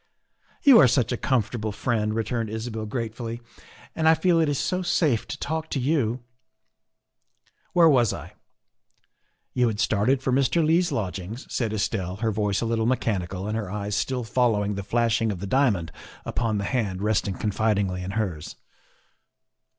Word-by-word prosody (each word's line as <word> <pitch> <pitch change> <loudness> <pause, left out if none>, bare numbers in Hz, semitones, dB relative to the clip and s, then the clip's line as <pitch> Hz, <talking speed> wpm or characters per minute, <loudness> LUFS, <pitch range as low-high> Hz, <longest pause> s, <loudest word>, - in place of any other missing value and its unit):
" - - -36
You 275 -6 +8
are 135 - +7
such 125 -1 +1
a - - +1
comfortable 110 -3 -1
friend," 110 0 -1
returned 115 0 -2
Isabel 110 0 -4
gratefully, 115 +1 -4 0.3
" - - -22
and 160 -1 +3
I 160 - +6
feel 170 +1 +2
it 160 -2 +2
is 145 - 0
so 180 +6 -1
safe 155 -9 +1
to - - -5
talk 160 +1 -3
to 140 - -2
you. 130 -4 0 1.5
Where 170 -2 +6
was 125 -8 +4
I? - - -8 0.4
" - - -46
" - - -47
You 125 -1 +2
had 110 -2 -2
started 115 +7 +2
for 130 - 0
Mr. 140 +5 +2
Leigh's 170 +2 +2
lodgings," 100 - -4
said 115 -4 -1
Estelle, 100 -3 -2
her 110 +2 -1
voice 105 -1 0
a - - -1
little 115 0 0
mechanical 100 -6 -1
and 105 - -2
her 105 -4 -3
eyes 105 0 -3
still 125 +2 -1
following 110 -4 +1
the 100 - -4
flashing 115 +2 +1
of 95 - -5
the 100 - -5
diamond 100 - +1 0.3
upon 115 -3 -1
the 100 - -2
hand 100 -5 -2
resting 105 -2 0
confidingly 100 -3 0
in 90 - -5
hers. 90 -9 -3
115 Hz, 175 wpm, -25 LUFS, 105-130 Hz, 1.5 s, You